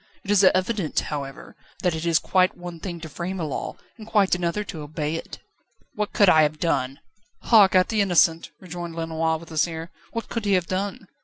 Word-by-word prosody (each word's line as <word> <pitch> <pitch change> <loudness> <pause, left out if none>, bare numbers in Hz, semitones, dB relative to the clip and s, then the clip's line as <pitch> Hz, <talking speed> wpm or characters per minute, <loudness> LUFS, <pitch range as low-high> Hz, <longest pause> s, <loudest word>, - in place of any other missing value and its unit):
It 200 - -3
is 205 -1 +5
evident, 185 -2 +2
however, 140 -2 -6 0.3
that 180 -2 +2
it 160 +1 -3
is 165 -1 +4
quite 185 +3 +2
one 175 -1 -8
thing 175 -1 -6
to 160 - -6
frame 175 +5 -5
a - - -2
law 150 -3 -4 0.2
and 215 - -10
quite 205 -4 +3
another 180 +3 0
to 165 -6 -7
obey 150 0 -3
it." 165 - -7 0.6
"What 210 -1 -2
could 205 - +4
I 160 -3 +7
have 155 0 +1
done?" 135 -6 0 0.5
"Hark 205 -5 +6
at 185 0 +4
the 220 -2 +2
innocent!" 170 -3 +3
rejoined 175 -2 -7
Lenoir, 160 0 -1
with 165 +1 -13
a 155 - -2
sneer. 165 +1 -1 0.2
"What 230 - -4
could 230 -2 -4
he 200 - +2
have 180 -2 +2
done? 195 +2 -3
175 Hz, 210 wpm, -24 LUFS, 160-195 Hz, 0.6 s, I